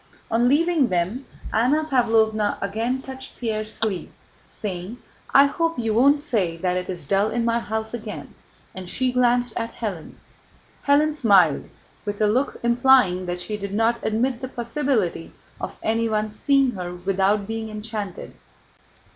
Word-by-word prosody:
On 235 +2 +3
leaving 315 -1 +3
them, 185 +8 -2 0.3
Anna 260 +8 +3
Pávlovna 225 -6 +2
again 230 +6 -2
touched 265 0 -8
Pierre's 215 -2 -3
sleeve, 210 -5 -2 0.4
saying: 190 +2 -6 0.3
"I 275 - +7
hope 330 +3 -1
you 225 -2 0
won't 280 +6 +5
say 205 - -1
that 180 +1 -1
it 180 0 -3
is 175 -5 -5
dull 195 +7 +2
in 230 +1 -1
my 235 0 +2
house 220 0 -3
again," 210 -11 -7 0.4
and 185 -1 -8
she 255 +5 0
glanced 245 -1 +2
at 230 0 -5
Hélène. 195 -8 -5 0.7
Hélène 300 +2 +4
smiled, 195 - +3 0.3
with 205 -1 -4
a 215 - +3
look 245 +7 +1
implying 235 -7 +4
that 175 0 -3
she 210 +3 -4
did 200 -1 -5
not 230 +2 +2
admit 235 +3 0
the 260 - -3
possibility 240 - -2 0.3
of - - -6
anyone 220 -1 0
seeing 275 +3 +2
her 180 -4 -6
without 195 +3 +1
being 225 +1 -4
enchanted. 215 -3 -6
220 Hz, 150 wpm, -23 LUFS, 200-250 Hz, 0.7 s, I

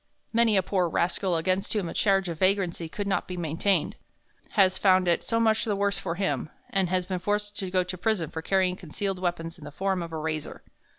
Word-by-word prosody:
Many 230 -2 +4
a 190 - +3
poor 180 -2 +1
rascal 175 +2 0
against 185 +4 0
whom 205 -5 0
a - - -5
charge 195 -2 +2
of 165 -2 -5
vagrancy 185 -4 +1
could 205 +5 -4
not 200 -1 0
be 180 - -5
maintained 175 +4 0 0.6
has 190 -3 +4
found 185 -2 +4
it 170 - +2
so 230 - 0
much 220 -1 +3
the 215 -3 0
worse 200 0 0
for 165 - -3
him, 155 -6 -1 0.2
and 190 -3 +1
has 185 0 +1
been 185 0 -3
forced 205 +2 -1
to 190 - -3
go 185 0 +2
to 180 +1 -6
prison 180 -5 0
for 160 - -4
carrying 185 +1 +1
concealed 190 +2 -4
weapons 175 -1 -3
in - - -13
the 150 - -7
form 190 +3 -1
of 170 -1 -6
a 160 - -4
razor. 155 -1 -4
185 Hz, 225 wpm, -27 LUFS, 170-200 Hz, 0.6 s, Many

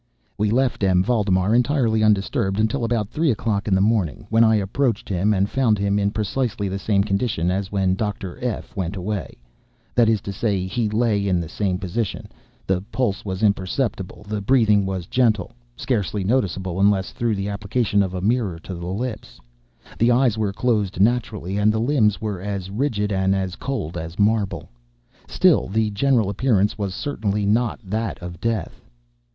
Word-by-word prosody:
We 105 0 0
left 125 -1 +1
M. 90 -1 +4
Valdemar 100 -3 +1
entirely 120 -3 +2
undisturbed 105 0 +1
until 115 +4 +1
about 115 -3 0
three 160 0 0
o'clock 105 -3 -1
in 95 - +3
the 95 - +2
morning, 105 -1 0
when 115 +1 +5
I 110 -1 +5
approached 110 +3 0
him 95 +2 +1
and 100 -1 +2
found 115 -3 +2
him 100 0 +1
in 100 0 +1
precisely 110 +1 -2
the 95 +1 -3
same 100 -1 +2
condition 100 -4 0
as 95 0 -2
when 95 -2 +1
Dr. 100 0 -4
F—— 120 -4 -4
went 95 0 -3
away—that 95 - -3
is 110 -2 +2
to 100 - -6
say, 95 -2 -1
he 105 +4 -1
lay 105 -2 +1
in 90 -2 +2
the 85 - -4
same 95 +2 -1
position; 100 +3 -3 0.4
the 95 -1 0
pulse 120 -7 -1
was 95 0 -4
imperceptible; 100 0 -1
the 105 -1 -3
breathing 105 -3 +3
was 95 -2 -3
gentle 110 -4 +1 0.3
(scarcely 105 -5 -1
noticeable, 95 -5 -1
unless 100 -1 +2
through 115 -2 -1
the 100 +1 -3
application 100 +1 0
of 95 -1 -2
a 90 - -3
mirror 105 -4 0
to 90 +3 -8
the 85 0 -6
lips); 110 +5 -5 0.6
the 115 - +4
eyes 120 -2 +3
were 110 -3 -1
closed 105 -4 0
naturally; 105 -3 0
and 105 +1 +4
the 110 - -1
limbs 115 -5 +2
were 105 -5 -4
as 95 -1 -4
rigid 105 -3 -1
and 95 0 +2
as 95 -1 -2
cold 125 - -4
as 80 +2 -7
marble. 105 -1 +1 0.6
Still, - - +3
the 110 +2 0
general 115 0 +2
appearance 105 -1 +1
was 100 -3 -3
certainly 105 -8 -2
not 115 +3 +1
that 110 +2 -2
of 85 -1 -9
death. 115 -3 -2
105 Hz, 175 wpm, -22 LUFS, 95-115 Hz, 0.6 s, when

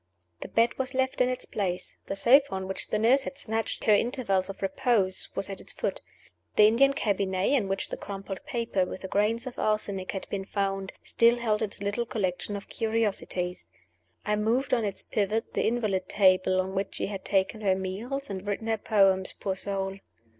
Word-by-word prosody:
The - - -6
bed 230 +3 +2
was 260 0 -2
left 260 0 +1
in 250 - +4
its 255 0 -3
place; 185 -3 -3
the - - -2
sofa 265 +8 +6
on 190 0 -4
which 190 - -2
the - - 0
nurse 240 +6 +4
had 275 0 -6
snatched 225 -4 -2
her 215 - +5
intervals 205 -4 +1
of 195 - -7
repose 195 -2 +1
was 195 - +1
at 195 -1 -6
its - - -5
foot; - - -2 0.5
the 210 - +7
Indian 260 +6 +5
cabinet, 195 -6 0
in 255 -9 +2
which 195 0 -2
the - - -4
crumpled 195 -1 -6
paper 230 -5 -1
with 180 - -5
the 190 - -5
grains 215 +5 +1
of 255 - -7
arsenic 200 -3 0
had 190 - -5
been 195 -1 -2
found, 195 -1 -2
still 235 +1 +4
held 220 -3 0
its 205 -1 -3
little 205 +4 -1
collection 200 -1 -2
of 200 - -7
curiosities. 210 -5 -1 0.6
I 210 0 +1
moved 235 +6 +1
on 235 -3 +3
its 200 -2 -3
pivot 215 +2 -1
the - - +1
invalid 215 -5 0
table 185 -1 +4
on 190 +1 -1
which 195 +1 -2
she - - -1
had 195 -2 -5
taken 200 +2 0
her 195 -2 +3
meals 220 +9 -4
and 190 -2 -5
written 205 +2 -2
her 225 0 +1
poems, 195 -3 +3
poor 190 -1 -1
soul. 195 0 -3
205 Hz, 195 wpm, -28 LUFS, 190-230 Hz, 0.6 s, the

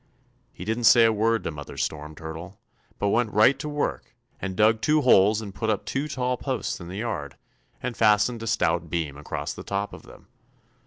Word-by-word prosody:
He - - -9
didn't 115 +2 -1
say 115 0 +8
a 110 - +4
word 115 +2 +1
to - - -3
Mother 75 -1 -9
Storm 75 0 -3
Turtle, 80 +4 -8 0.4
but 100 - 0
went 115 +1 +1
right 110 +6 +5
to 150 - -4
work 145 -4 -3 0.3
and 95 -1 -3
dug 110 +1 +4
two 150 0 +3
holes 105 -4 +5
and 100 -3 -8
put 105 +4 -2
up 105 - -1
two 140 +3 -2
tall 125 -3 -1
posts 130 -5 -3
in 85 - -8
the 95 +2 -7
yard 85 - -4 0.5
and 125 -1 -3
fastened 110 +2 +3
a 115 - -5
stout 85 -5 +1
beam 80 -4 -2
across 75 +1 -5
the - - -9
top 100 +1 -3
of - - -10
them. - - -16
105 Hz, 205 wpm, -25 LUFS, 90-120 Hz, 0.5 s, say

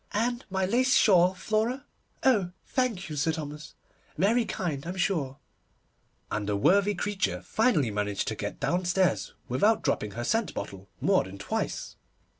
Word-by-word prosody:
And 240 +4 0
my 190 0 0
lace 255 +6 +3
shawl, 185 -3 +5
Flora? 225 +8 -1 0.4
Oh, 205 -9 +3
thank 240 -8 -1
you, 155 - -6
Sir 150 +3 +1
Thomas, 150 -1 -7 0.4
very 225 +8 +3
kind, 150 -7 -3
I'm 180 - -4
sure'; 155 -9 0 0.9
and 105 -1 -2
the 105 - +1
worthy 200 - +3
creature 205 +2 -1
finally 170 - +2
managed 105 -1 -2
to - - -3
get - - -5
downstairs 175 - +1
without 205 - +2
dropping 105 -1 -1
her 120 - -4
scent 220 - 0
bottle 95 0 -7
more - - +3
than 95 +1 -9
twice. 100 - -3
180 Hz, 150 wpm, -28 LUFS, 135-215 Hz, 0.9 s, shawl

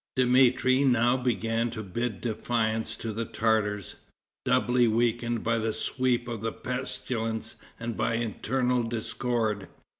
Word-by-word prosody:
] - - -66
Dmitri 130 +1 +4
now 120 -2 +4
began 115 -2 0
to 110 -2 -5
bid 110 +2 -3
defiance 110 -1 -1
to 110 -1 -5
the 115 +2 -2
Tartars, 105 -4 0 0.5
doubly 125 0 +3
weakened 120 0 +1
by 115 0 +1
the 110 0 -1
sweep 125 0 0
of 115 -3 -4
the 115 0 -1
pestilence 115 -2 -3 0.2
and 115 -1 -3
by 115 - 0
internal 125 +2 0
discord. 115 -2 -1
115 Hz, 130 wpm, -28 LUFS, 110-125 Hz, 0.5 s, Dmitri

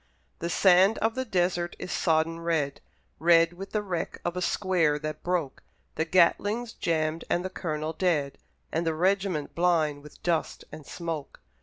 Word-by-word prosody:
The 170 - -3
sand 190 +3 +5
of 225 +1 +1
the 260 +1 -3
desert 175 -4 0
is - - -6
sodden 165 0 +1
red, 160 -4 -1 0.4
Red 165 +1 +5
with 195 +3 -9
the 210 -1 -1
wreck 180 -4 -4
of 175 0 -1
a 180 - -2
square 175 -6 +1
that 155 0 -5
broke; 175 -6 -2 0.3
The 160 - -1
Gatling's 205 +7 +2
jammed 160 -1 -1
and 175 +1 0
the 185 - -4
Colonel 155 -3 -3
dead, 155 -5 0 0.3
And 165 - 0
the 165 -1 0
regiment 185 -3 0
blind 160 -4 +1
with 150 0 -15
dust 170 -3 -1
and 150 - -10
smoke. 165 -5 -5
170 Hz, 165 wpm, -27 LUFS, 155-185 Hz, 0.4 s, sand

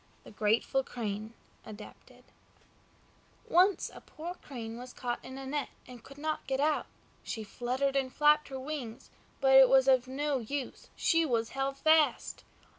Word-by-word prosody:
THE - - -13
GRATEFUL 220 +5 +1
CRANE 215 -2 -4 0.3
(Adapted) 215 -1 -12 1.2
Once 370 +3 +3
a - - -11
poor 335 +3 -7
Crane 235 -9 -8
was 250 0 -9
caught 240 -1 -4
in 260 - -9
a 270 - -7
net, 285 +1 -2 0.2
and 245 -2 -12
could 275 - -14
not 310 +1 -3
get 265 0 -1
out. 300 +1 +1 0.3
She 220 - -5
fluttered 255 +6 -2
and 265 -2 0
flapped 300 +1 +4
her 265 -1 -6
wings, 260 -5 -6 0.3
but 270 -1 +4
it 265 -1 +9
was 265 0 +5
of 260 -2 +4
no 280 +1 -1
use, 260 +3 -5
she 330 -1 +2
was 230 -6 0
held 270 0 -2
fast. 315 +1 +2
265 Hz, 160 wpm, -31 LUFS, 240-290 Hz, 1.2 s, it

